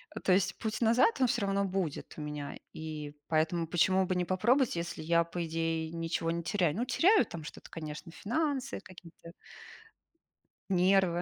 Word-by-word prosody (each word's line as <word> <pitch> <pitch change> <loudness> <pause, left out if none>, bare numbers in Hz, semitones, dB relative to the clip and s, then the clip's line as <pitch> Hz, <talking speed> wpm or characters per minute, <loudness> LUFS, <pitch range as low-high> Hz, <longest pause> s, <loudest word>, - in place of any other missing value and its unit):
Э, - - -3
то 185 - +3
есть, 190 +1 +2
путь 220 0 -3
назад 235 - +4
он 255 - +5
всё 240 -1 0
равно 200 0 +1
будет 185 -5 -3
у - - -5
меня. 150 -1 -5 0.2
И 155 -2 -6
поэтому, 165 +1 +1
почему 185 +3 +3
бы 185 - -1
не 180 0 0
попробовать, 240 +8 +2
если 170 -1 -4
я, 170 +1 +3
по 170 +1 -4
идее, 165 0 -2
ничего 165 0 -2
не 170 0 -2
теряю? 175 -4 +1
Ну, 240 +5 -1
теряю 390 - +4
там 165 -2 -8
что-то, 150 - -10
конечно, 155 0 -7
финансы 270 - -2
какие-то. 175 -3 -13 1.4
Нервы, 185 -1 +3
175 Hz, 170 wpm, -31 LUFS, 165-200 Hz, 1.4 s, он